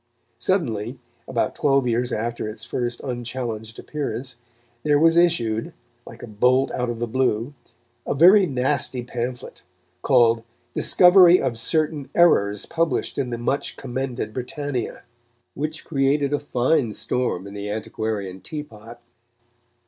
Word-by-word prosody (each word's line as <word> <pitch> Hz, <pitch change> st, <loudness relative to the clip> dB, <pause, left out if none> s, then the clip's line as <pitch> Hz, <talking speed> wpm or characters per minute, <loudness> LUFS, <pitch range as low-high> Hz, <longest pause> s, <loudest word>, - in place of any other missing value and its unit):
Suddenly, 125 Hz, -, -1 dB, 0.3 s
about 125 Hz, -3 st, -1 dB
twelve 135 Hz, -3 st, +2 dB
years 120 Hz, +1 st, 0 dB
after 115 Hz, 0 st, -3 dB
its 110 Hz, 0 st, -7 dB
first 120 Hz, 0 st, -3 dB
unchallenged 120 Hz, -3 st, -5 dB
appearance, 130 Hz, -4 st, -5 dB, 0.4 s
there 145 Hz, +2 st, +3 dB
was 165 Hz, +2 st, +4 dB
issued, 120 Hz, -11 st, +1 dB, 0.3 s
like -, -, -11 dB
a -, -, -7 dB
bolt 125 Hz, +5 st, +2 dB
out 125 Hz, -1 st, -2 dB
of 120 Hz, -, -3 dB
the 120 Hz, -, -2 dB
blue, 125 Hz, +1 st, 0 dB, 0.5 s
a -, -, 0 dB
very 185 Hz, +6 st, +7 dB
nasty 130 Hz, -2 st, 0 dB
pamphlet, 120 Hz, 0 st, -5 dB, 0.4 s
called 115 Hz, -2 st, +4 dB, 0.3 s
Discovery 180 Hz, -1 st, +6 dB
of 115 Hz, -2 st, -2 dB
certain 150 Hz, +1 st, -1 dB
Errors 105 Hz, -13 st, +3 dB
Published 165 Hz, -3 st, -1 dB
in 130 Hz, -3 st, -1 dB
the 120 Hz, -, -3 dB
much 120 Hz, +4 st, -2 dB
commended 125 Hz, -4 st, -4 dB
Britannia, 130 Hz, 0 st, -4 dB, 0.5 s
which 155 Hz, +2 st, -5 dB
created 140 Hz, -1 st, +1 dB
a 145 Hz, -, +1 dB
fine 130 Hz, -3 st, +1 dB
storm 120 Hz, -5 st, -2 dB
in 100 Hz, -, -9 dB
the 100 Hz, 0 st, -5 dB
antiquarian 105 Hz, -3 st, -4 dB
teapot. 115 Hz, -, -9 dB
125 Hz, 130 wpm, -23 LUFS, 115-145 Hz, 0.5 s, very